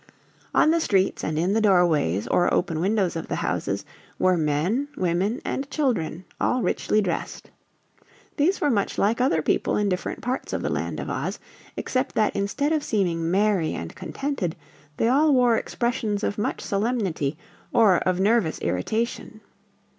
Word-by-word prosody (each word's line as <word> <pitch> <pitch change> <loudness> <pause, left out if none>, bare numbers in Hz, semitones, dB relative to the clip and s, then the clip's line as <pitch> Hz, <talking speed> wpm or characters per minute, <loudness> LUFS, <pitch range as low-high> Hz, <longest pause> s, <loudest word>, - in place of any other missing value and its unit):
On 310 - +5
the 335 0 +2
streets 195 - +1
and 155 0 -2
in 175 +5 +1
the 220 - +2
doorways 170 - +3
or 175 - +2
open 165 -3 0
windows 190 -1 +1
of 165 - -4
the - - -2
houses - - -2 0.3
were 185 0 +3
men, 165 - 0
women 185 +6 0
and 275 +1 -3
children, 200 - -1
all 250 -2 +1
richly 215 - +1
dressed. 180 -5 -4 0.9
These 330 +6 +2
were 290 - +2
much 200 -4 0
like 225 +4 +2
other 165 - +2
people - - +1
in 205 -1 +1
different 180 -1 -3
parts 250 +2 -3
of - - -2
the - - -1
Land - - -2
of - - -4
Oz, - - -3 0.4
except 260 +1 -2
that 215 - +2
instead 275 +10 0
of 305 -2 0
seeming 170 - 0
merry 195 -3 +2
and 85 - -6
contented 270 - -3 0.4
they 225 - +2
all 285 +4 +4
wore 245 -2 +4
expressions 220 -3 -1
of 205 - -1
much 210 - -2
solemnity 195 - -1 0.3
or 210 -6 +5
of 185 -1 0
nervous 200 -4 +2
irritation. 220 - -2
205 Hz, 160 wpm, -24 LUFS, 175-245 Hz, 0.9 s, On